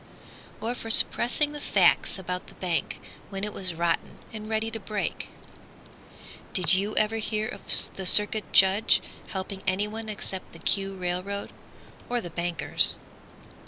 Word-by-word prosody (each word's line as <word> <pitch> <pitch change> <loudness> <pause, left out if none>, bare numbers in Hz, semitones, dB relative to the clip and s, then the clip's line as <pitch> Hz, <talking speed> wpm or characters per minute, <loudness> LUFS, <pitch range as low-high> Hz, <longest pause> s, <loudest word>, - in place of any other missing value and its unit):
Or 230 +2 -3
for 225 -2 -9
suppressing 245 +5 +1
the 295 - -8
facts - - +2
about 180 -1 -6
the - - -16
bank, 175 -3 -3 0.3
When 195 0 -7
it 210 0 -4
was 185 -3 +1
rotten 170 0 -2 0.2
and 215 0 -8
ready 220 0 -2
to 225 - -4
break? 210 0 -5 1.2
Did 180 -5 +3
you 200 +3 -1
ever 215 +1 0
hear 215 0 -3
of 200 - -9 0.3
the 190 -1 +2
Circuit 210 +2 +4
Judge 195 +3 +4 0.3
Helping 190 0 -6
anyone 210 +4 -2
except 195 -2 -7
the - - -11
"Q" 195 +3 0
railroad, 185 +2 -5 0.6
Or 245 0 -1
the 175 -6 -8
bankers? 170 0 +3
200 Hz, 145 wpm, -25 LUFS, 185-220 Hz, 1.2 s, Circuit